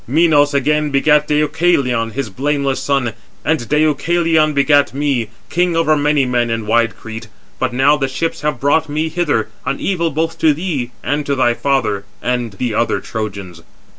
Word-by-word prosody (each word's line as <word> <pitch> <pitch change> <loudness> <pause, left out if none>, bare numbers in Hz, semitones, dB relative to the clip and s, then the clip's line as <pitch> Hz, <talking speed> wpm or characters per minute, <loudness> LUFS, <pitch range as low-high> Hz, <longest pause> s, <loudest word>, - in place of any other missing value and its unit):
Minos 145 0 +3
again 150 +2 +1
begat 150 +2 +3
Deucalion, 150 -6 +1
his 130 -5 -4
blameless 140 +3 -1
son, 135 -5 0 0.3
and 150 -6 0
Deucalion 155 +1 +2
begat 145 -1 +2
me, 140 -5 0 0.2
king 175 0 +1
over 160 -2 +3
many 145 -1 +2
men 120 -1 0
in 115 -1 -2
wide 115 +1 +1
Crete. 110 0 -8 0.3
But 130 -1 0
now 135 +4 +3
the 135 -2 -1
ships 165 +5 -3
have 150 -4 -2
brought 150 +4 +1
me 155 +2 -1
hither, 150 -10 0
an 135 +2 -2
evil 170 -4 0
both 160 +2 -2
to 155 -2 +3
thee 150 -7 -3
and 145 +1 -1
to 140 - +1
thy 120 -2 +2
father, 135 -7 0 0.2
and 120 -3 -2
the 120 +3 -3
other 115 +2 0
Trojans." 100 -6 -6
140 Hz, 165 wpm, -17 LUFS, 120-155 Hz, 0.3 s, Minos